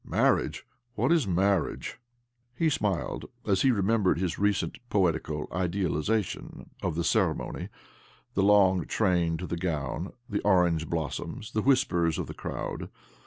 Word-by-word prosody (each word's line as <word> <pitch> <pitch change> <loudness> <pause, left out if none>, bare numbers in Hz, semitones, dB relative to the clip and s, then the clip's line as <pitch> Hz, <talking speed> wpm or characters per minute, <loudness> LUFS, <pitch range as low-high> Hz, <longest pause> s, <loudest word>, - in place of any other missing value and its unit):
Marriage! - - +1 0.3
What 120 +8 +1
is 160 -10 +3
marriage? 95 -1 0 0.3
" 120 - -53 0.2
He 160 +4 +2
smiled 100 -9 -1 0.2
as 95 -2 +2
he 135 - +4
remembered 105 -4 +2
his 90 -1 -2
recent 100 -1 0
poetical 85 -6 0
idealization 90 +2 -2
of - - -1
the 85 - 0
ceremony— - - 0 0.6
the 95 - +1
long 95 -3 +5
train 90 -5 +1
to 90 - -5
the 85 - -3
gown, 85 0 -3
the 105 - -2
orange 90 -5 +3
blossoms, 85 +6 -4
the 110 - 0
whispers 95 - +2
of - - -2
the - - -7
crowd. - - -5
95 Hz, 140 wpm, -28 LUFS, 85-105 Hz, 0.6 s, long